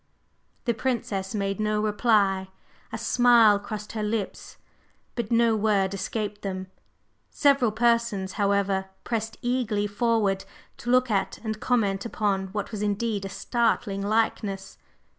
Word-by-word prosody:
The 235 - +2
Princess 220 -5 -2
made 195 -1 -1
no 215 0 +1
reply. 210 -3 +2 0.4
A - - -3
smile 235 -4 +5
crossed 210 +1 -6
her 220 - -4
lips, 210 -1 -3 0.6
but 235 -2 -4
no 230 -1 +4
word 200 -3 +1
escaped 205 +1 -3
them. 190 -1 -5 0.6
Several 275 -6 +3
persons, 230 -4 +1
however, 200 -1 0
pressed 225 -1 -3
eagerly 240 -4 0
forward 205 -2 +1 0.3
to 240 - -6
look 255 -1 +3
at 195 -2 0
and 220 -1 -3
comment 205 -6 +1
upon 200 -4 -1
what 205 +4 -4
was 210 -2 -4
indeed 210 0 -1
a - - -4
startling 220 -2 0
likeness. 205 -2 -1
210 Hz, 130 wpm, -26 LUFS, 200-230 Hz, 0.6 s, smile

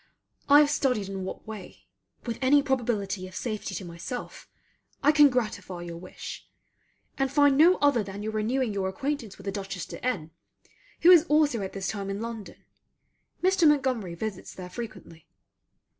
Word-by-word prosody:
I 290 +1 +9
have 290 -1 +3
studied 250 -9 0
in 190 -1 -4
what - - -7
way, 215 -4 -10 0.4
with 235 -2 -4
any 280 +2 +5
probability 215 -8 -1
of 185 - -13
safety 215 0 -4
to 190 - -5
myself, 175 +9 -7 0.5
I 295 - +6
can 295 -1 +7
gratify 205 -8 -3
your 170 -1 -7
wish; 180 +2 -9 0.7
and 270 -1 +1
find 285 -1 +5
no 335 +6 +6
other 285 -5 +4
than 200 +1 -7
your 220 - -2
renewing 220 +2 0
your 190 -1 -1
acquaintance 270 -2 -4
with 195 - -13
the 195 - -1
Dutchess 195 -2 -5
de - - -10
N, 185 -11 -2 0.7
who 350 - +8
is 340 -2 +8
also 295 -7 +2
at 190 - -5
this 195 -1 -3
time 200 -2 -4
in 195 +1 -3
London. 225 -2 -7 0.8
Mr. 375 -3 +4
Montgomery 260 -11 +1
visits 200 +1 -6
there 180 -1 -8
frequently. 215 -8 -9
220 Hz, 170 wpm, -27 LUFS, 195-275 Hz, 0.8 s, I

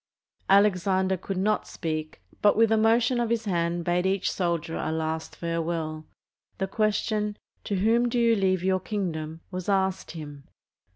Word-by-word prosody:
Alexander 190 -1 +3
could 190 +1 -5
not 210 +3 +1
speak, 155 - -5 0.2
but 205 0 +4
with 225 0 +4
a - - +5
motion 230 +3 +3
of 235 -1 0
his 230 -1 0
hand 170 -2 0
bade 180 +1 +1
each 195 0 0
soldier 170 -2 -1
a - - -2
last 160 0 -3
farewell. 165 -2 -3 0.5
The 190 - 0
question 210 +1 0 0.3
"To 205 - -1
whom 230 +5 +3
do 245 - -1
you 230 -1 +4
leave 185 -3 +1
your 190 0 +2
kingdom," 165 -6 -4
was 185 +1 -4
asked 190 -1 0
him. 145 -3 -9
190 Hz, 160 wpm, -26 LUFS, 170-210 Hz, 0.5 s, a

